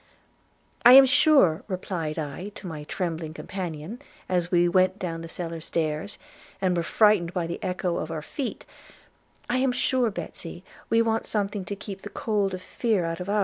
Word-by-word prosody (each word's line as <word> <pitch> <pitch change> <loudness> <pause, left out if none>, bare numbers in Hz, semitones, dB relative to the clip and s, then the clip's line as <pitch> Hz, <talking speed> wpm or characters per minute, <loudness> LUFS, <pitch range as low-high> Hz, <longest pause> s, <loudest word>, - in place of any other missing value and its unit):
'I 245 +1 +10
am 270 +1 +11
sure,' 265 - +5
replied 180 -5 -3
I 160 +6 -4
to - - -10
my 155 -4 -6
trembling 165 -2 -4
companion, 180 - -6 0.3
as 180 -2 0
we 175 -1 +4
went 185 +2 +3
down 165 -4 -4
the 165 - -7
cellar 165 -1 -5
stairs, 160 +4 -2 0.4
and 185 -1 +1
were 170 - +1
frightened 185 -1 +3
by 175 -2 0
the 170 +1 -5
echo 180 -1 -1
of 155 - -3
our 160 -2 -4
feet, 260 - -5 0.8
'I 245 - +1
am 260 0 +2
sure, 250 -1 +1
Betsy, 175 -1 -7 0.3
we 230 0 +4
want 225 0 0
something 205 -2 -2
to 200 - -4
keep 195 -1 -8
the - - -7
cold 205 -4 -1
of 185 - -9
fear 215 -4 0
out 165 0 -3
of 180 +2 -5
ours. 210 +1 +2
185 Hz, 185 wpm, -26 LUFS, 165-210 Hz, 0.8 s, am